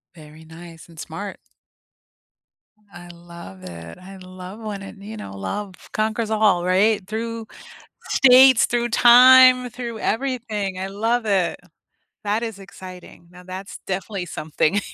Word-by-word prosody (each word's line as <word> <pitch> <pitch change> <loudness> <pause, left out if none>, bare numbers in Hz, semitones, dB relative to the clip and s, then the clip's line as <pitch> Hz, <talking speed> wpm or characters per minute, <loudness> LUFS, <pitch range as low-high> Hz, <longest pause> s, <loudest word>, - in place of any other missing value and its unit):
Very 155 0 -15
nice 165 0 -13
and 165 -2 -15
smart. 195 +5 -7 1.5
I 175 0 -12
love 170 - -13
it, 85 -2 -10
I 190 +1 -13
love 185 +2 -11
when 210 -3 -6
it 195 - -11
you 210 +3 -10
know, 100 - -9
love 185 - -5 0.2
conquers 220 +1 -1
all, 210 -5 +2
right? 195 +2 +2
Through 225 +1 -5 0.6
states, 260 -1 +6
through 240 0 -1
time, 255 +1 +7
through 235 -2 -7
everything, 220 -6 -3
I 190 - -3
love 225 +4 -1
it. 190 -5 0 0.7
That 210 +3 -1
is 225 -3 -5
exciting, 185 -3 -13
now 180 0 -15
that's 185 +2 -8
definitely 190 0 -4
something 155 +4 -1
200 Hz, 135 wpm, -21 LUFS, 175-225 Hz, 1.5 s, time